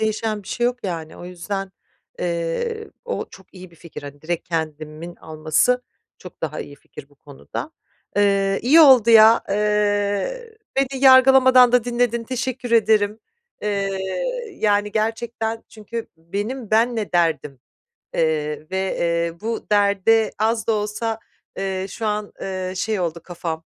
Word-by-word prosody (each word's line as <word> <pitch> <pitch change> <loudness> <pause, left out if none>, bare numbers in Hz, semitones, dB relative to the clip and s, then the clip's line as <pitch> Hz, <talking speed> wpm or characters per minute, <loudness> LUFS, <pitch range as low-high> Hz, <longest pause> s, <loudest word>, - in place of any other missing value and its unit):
değişen 215 -1 -1
bir - - -14
şey 240 - 0
yok 250 0 -1
yani. 165 -4 -5
O - - -10
yüzden, 190 +2 -5 0.5
eee, 175 - -3
o 485 - -3
çok 190 - -15
iyi 185 -1 -11
bir 170 - -20
fikir, 165 -1 -10
hani, 145 +1 -10
direkt 170 +1 -4
kendimin 155 +1 -4
alması 155 +11 0 0.4
çok 180 - -13
daha 155 -2 -3
iyi 145 - -9
fikir 140 - -13
bu 145 - -25
konuda. 70 - -8 0.5
Eee, 195 -1 +2
iyi 295 +7 +6
oldu 255 -7 +7
ya, 225 +1 +7
eee, 210 - 0 0.2
beni 270 0 0
yargılamadan 260 -1 +7
da 245 -2 +4
dinledin, 240 -1 0
teşekkür 255 0 -4
ederim. 215 -1 +3 0.4
Eee, 200 -2 -1 0.6
yani, 205 -5 +1
gerçekten 225 +1 -2
çünkü 225 +1 -7
benim 205 +8 -5
benle 225 -2 +1
derdim, 155 -6 0 0.5
eee, 155 0 -1
ve, 190 0 -1
eee, 170 0 -1
bu 225 +1 -4
derde 205 +2 +3
az 220 +1 0
da 225 - +2
olsa, 215 +2 -2 0.4
eee, 190 -1 -2
şu 220 +3 -5
an, 210 0 -2
eee, 185 -1 -4
şey, 210 +2 -1
oldu 170 -1 -2
kafam, 165 -2 -5
205 Hz, 140 wpm, -21 LUFS, 175-230 Hz, 0.6 s, oldu